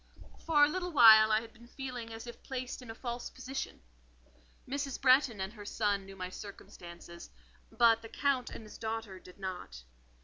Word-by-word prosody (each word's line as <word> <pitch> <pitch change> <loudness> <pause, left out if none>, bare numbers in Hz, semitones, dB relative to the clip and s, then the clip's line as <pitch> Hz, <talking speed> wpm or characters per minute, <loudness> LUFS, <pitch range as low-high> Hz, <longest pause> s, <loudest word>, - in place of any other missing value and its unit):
For 300 -3 +4
a - - +1
little 360 +3 -3
while 220 -6 +8
I 215 +1 +3
had 230 - -12
been 235 +1 -17
feeling 250 -3 -7
as 225 +1 -8
if 240 -1 -10
placed 255 -1 -5
in 250 - -12
a 225 - -6
false 240 0 -5
position. 260 +1 -6 0.9
Mrs. 275 0 -3
Bretton 255 -4 +4
and 190 +2 -4
son 200 -3 -1
knew 195 - -10
my 185 -1 -5
circumstances; 170 -4 -10 0.4
but 230 -1 +4
the 225 - -10
Count 265 -2 0
and - - -9
his 215 - -12
daughter 220 -4 -4
did 180 0 -15
not. 180 - -7
225 Hz, 175 wpm, -32 LUFS, 200-255 Hz, 0.9 s, while